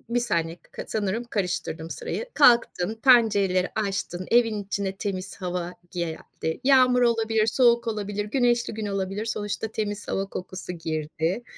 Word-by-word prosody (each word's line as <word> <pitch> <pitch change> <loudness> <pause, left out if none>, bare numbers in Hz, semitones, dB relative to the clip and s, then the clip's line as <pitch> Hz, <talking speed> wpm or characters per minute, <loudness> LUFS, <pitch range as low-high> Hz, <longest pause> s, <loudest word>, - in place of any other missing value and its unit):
1 - - +4
saniye 170 -8 -1 0.2
k - - -6
sanırım 215 +2 -1
karıştırdım 180 -7 -3
sırayı. 470 - -4
Kalktın, 235 -7 +4
pencereleri 205 -8 +4
açtın, 195 -3 -2
evin 225 -3 +3
içine 195 -1 -3
temiz 195 -1 -4
hava 180 -1 -3 0.2
geldi, 160 0 -4
yağmur 255 -2 +5
olabilir, 225 -2 +2
soğuk 235 -1 +3
olabilir, 205 -1 -2
güneşli 240 0 +1
gün 215 -1 -4
olabilir. 195 +1 -2
Sonuçta 215 0 -3
temiz 210 -1 -4
hava 195 - -1
kokusu 185 -1 -6
girdi. 160 +5 -2
205 Hz, 135 wpm, -25 LUFS, 185-230 Hz, 0.2 s, yağmur